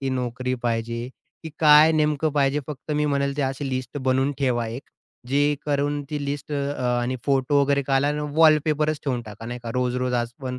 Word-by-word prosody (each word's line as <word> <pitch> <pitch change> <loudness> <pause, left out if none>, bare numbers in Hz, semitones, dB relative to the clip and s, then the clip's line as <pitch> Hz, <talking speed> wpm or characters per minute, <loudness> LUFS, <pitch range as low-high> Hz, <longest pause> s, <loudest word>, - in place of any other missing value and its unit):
की 135 - -2
नोकरी 125 0 -2
पाहिजे 115 +1 -2 0.3
की 160 - -7
काय 155 0 +7
नेमकं 150 0 +1
पाहिजे. 145 0 +1
फक्त 150 +1 -8
मी 150 0 +1
म्हणेल 140 -1 0
ते 145 - 0
अशी 135 +1 -2
लिस्ट 130 +1 -4
बनवून 130 +1 +1
ठेवा 125 -4 0
एक 120 +5 -6 0.5
जे 145 +2 +2
करून, 145 0 0
ती 145 -1 -3
लिस्ट 145 +1 -4
अ, 140 -4 -1
आणि 125 +2 -2
फोटो 140 +1 +2
वगैरे 140 0 +2
काढ 135 0 +1
आणि 150 +1 0 0.2
वॉलपेपरच 155 -1 +3
ठेवून 130 -4 -1
टाका 110 +1 -10
नाही 120 +1 -5
का, 115 - -5
रोज-रोज 125 0 -1
आज 120 -1 0
पण 125 -1 -4
140 Hz, 195 wpm, -24 LUFS, 125-145 Hz, 0.5 s, काय